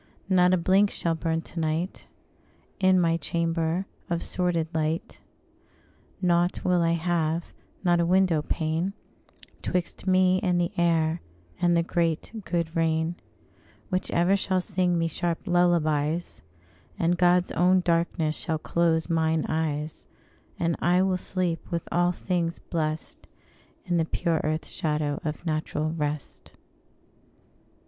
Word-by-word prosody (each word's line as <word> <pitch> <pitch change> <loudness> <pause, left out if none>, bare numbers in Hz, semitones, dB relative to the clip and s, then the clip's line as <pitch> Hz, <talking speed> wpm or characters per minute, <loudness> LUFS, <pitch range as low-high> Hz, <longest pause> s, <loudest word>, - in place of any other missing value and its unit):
Not 180 -1 +5
a 185 - +4
blink 190 +4 +3
shall 170 -3 -1
burn 165 0 -1
to 170 - -8
night 160 +3 -2 0.7
In 185 -1 +4
my 165 -1 +2
chamber, 165 +2 -1 0.2
of 170 -1 -1
sordid 175 -3 0
light; 160 +1 -2 1.0
Nought 175 0 +2
will 180 -1 +3
I 165 0 +2
have, 170 -1 -1 0.3
not 175 -2 +3
a 170 - +2
window 180 -3 +3
pane, 160 +5 -1 0.7
'Twixt 180 +1 -3
me 185 0 +4
and 180 -2 +1
the 175 -1 0
air 165 -1 +2 0.4
and 175 -1 +4
the 170 - +3
great 165 -2 -1
good 170 -2 -2
rain, 160 0 +1 0.8
Which 185 -1 -1
ever 175 +3 +3
shall 190 -1 0
sing 180 -2 0
me 165 0 +1
sharp 170 +1 -2
lullabies; 170 -2 +1 0.6
And 170 +1 +2
God's 180 0 +3
own 185 +1 +3
darkness 165 -2 0
shall 160 - -2
close 165 0 +1
mine 160 -2 +1
eyes; 155 -1 -2 0.5
And 170 0 0
I 180 +2 +3
will 190 -1 +1
sleep, 180 -2 -2
with 170 -1 -3
all 175 +1 +3
things 175 -2 -2
blest, 155 -2 -4 0.6
In 175 -1 0
the 165 - +2
pure 165 0 0
earth 155 0 -1
shadow 150 -2 -2
of 155 +1 -4
natural 155 -1 -1
rest. 150 -3 -4
170 Hz, 135 wpm, -26 LUFS, 160-180 Hz, 1.0 s, Not